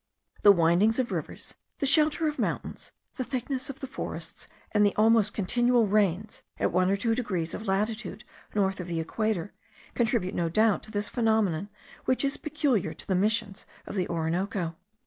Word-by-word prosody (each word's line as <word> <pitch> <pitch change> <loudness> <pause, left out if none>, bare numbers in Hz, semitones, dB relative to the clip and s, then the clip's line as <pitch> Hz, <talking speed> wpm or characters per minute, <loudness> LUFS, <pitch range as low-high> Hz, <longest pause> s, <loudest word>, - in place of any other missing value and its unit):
The 205 - +8
windings 180 +5 +3
of 255 -1 0
rivers, - - -5 0.2
the - - -1
shelter 310 +3 +4
of 300 0 -3
mountains, - - -3 0.3
the 255 - -1
thickness 255 +1 -3
of 275 +2 -8
the - - -3
forests, 265 - -7 0.2
and 210 -1 +3
the 205 - +2
almost 220 -1 +4
continual 240 +4 +2
rains, 205 0 0 0.2
at - - 0
one 185 +1 +2
or 195 - +3
two 225 +3 0
degrees 185 -9 -2
of 220 - -6
latitude 215 +2 -1 0.3
north 195 -2 +1
of 180 - -5
the 170 -2 -2
equator, 205 +3 -2 0.4
contribute 225 -6 0
no 170 -1 0
doubt 215 +3 +3
to 215 - -10
this 205 -1 -1
phenomenon, 215 -6 +1 0.4
which 260 +2 +2
is 275 - -1
peculiar 275 - 0
to - - -9
the 190 - +1
missions 205 +1 0 0.2
of - - -7
the 185 -3 -1
Orinoco. 170 +1 -2
210 Hz, 175 wpm, -28 LUFS, 185-240 Hz, 0.4 s, The